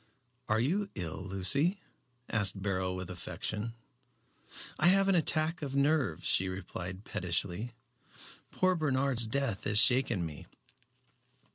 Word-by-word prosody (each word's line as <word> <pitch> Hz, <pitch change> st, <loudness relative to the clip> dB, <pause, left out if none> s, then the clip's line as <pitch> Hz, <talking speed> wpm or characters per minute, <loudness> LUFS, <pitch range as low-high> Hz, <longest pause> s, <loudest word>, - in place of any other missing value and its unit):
"Are 110 Hz, +1 st, +2 dB
you 190 Hz, -, 0 dB
ill, 85 Hz, -2 st, -4 dB
Lucy?" 135 Hz, -, +1 dB, 0.5 s
asked 105 Hz, -3 st, +1 dB
Beryl, 95 Hz, -2 st, -1 dB
with 90 Hz, 0 st, -5 dB
affection. 105 Hz, +5 st, -5 dB, 1.0 s
"I 175 Hz, -, +5 dB
have 195 Hz, +2 st, +5 dB
an 195 Hz, -, +4 dB
attack 160 Hz, -1 st, +1 dB
of 140 Hz, -2 st, -4 dB
nerves," 140 Hz, -, +1 dB
she 95 Hz, 0 st, +3 dB
replied 95 Hz, +1 st, -6 dB
pettishly. 90 Hz, +6 st, -2 dB, 0.7 s
"Poor 185 Hz, 0 st, +2 dB
Bernard's 135 Hz, -7 st, +1 dB
death 115 Hz, -4 st, -2 dB
has 105 Hz, -, +2 dB
shaken 120 Hz, -6 st, +5 dB
me." 75 Hz, -2 st, -8 dB
115 Hz, 120 wpm, -31 LUFS, 95-145 Hz, 1.0 s, I